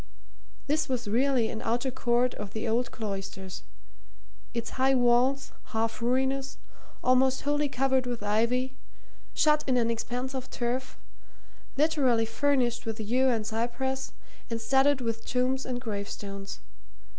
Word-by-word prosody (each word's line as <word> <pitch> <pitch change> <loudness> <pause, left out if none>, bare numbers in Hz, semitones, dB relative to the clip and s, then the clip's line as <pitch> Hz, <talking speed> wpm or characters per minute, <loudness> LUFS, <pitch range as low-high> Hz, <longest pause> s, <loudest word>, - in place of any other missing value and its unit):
This 300 +1 0
was 245 -3 -1
really 245 +1 +2
an 225 - -5
outer 240 +3 0
court 245 0 +1
of 205 -1 -7
the 220 +1 -3
old 235 +2 +1
cloisters; 195 -3 -5 0.9
its 235 -1 -3
high 265 +1 +3
walls, 250 +2 +3
half 225 +1 -2
ruinous, 265 +3 0 0.5
almost 255 +1 +3
wholly 290 0 +1
covered 265 -1 +1
with 240 -3 -3
ivy, 240 +5 +1 0.6
shut 300 -1 +4
in 255 -2 +3
an 230 -1 +2
expanse 245 +3 -3
of 260 -1 -5
turf, 245 +2 -2 0.8
liberally 270 -7 +3
furnished 240 0 +1
with 225 -1 -3
yew 250 +5 +2
and 225 -3 0
cypress 240 +4 -2 0.4
and 230 -1 -2
studded 270 +3 +3
with 230 -1 -2
tombs 255 +2 0
and 250 -1 -2
gravestones. 200 -3 -5
245 Hz, 135 wpm, -28 LUFS, 225-265 Hz, 0.9 s, shut